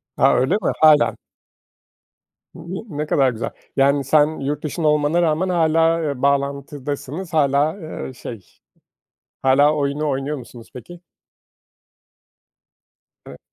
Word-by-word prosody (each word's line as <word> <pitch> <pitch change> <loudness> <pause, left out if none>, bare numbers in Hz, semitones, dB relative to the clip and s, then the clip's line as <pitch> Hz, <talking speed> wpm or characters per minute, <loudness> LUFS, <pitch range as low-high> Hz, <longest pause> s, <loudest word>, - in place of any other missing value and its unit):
Ha, - - +4
öyle 130 +7 +1
mi? 210 - 0
Hâlâ. 155 -1 +5 1.4
Imm, - - -10 0.2
ııı, 225 - -8
ne 150 - -1
kadar 135 -3 +2
güzel. 115 0 -4 0.3
Yani, 140 +1 +3
sen 150 +3 +2
yurt 145 +2 -3
dışında 155 +1 -2
olmana 150 +3 +2
rağmen 170 +3 +1
hâlâ, 165 -1 +2
ııı, 140 -5 -3
bağlantıdasınız; 140 +3 -2
hâlâ, 145 0 +2
ııı 160 -7 -8
şey, 115 -6 -9 1.0
hâlâ 145 +3 +4
oyunu 145 +1 -1
oynuyor 135 +2 -2
musunuz 120 -2 -12
peki? 175 +8 -11 2.3
Eve - - -11
145 Hz, 120 wpm, -20 LUFS, 140-155 Hz, 2.3 s, Hâlâ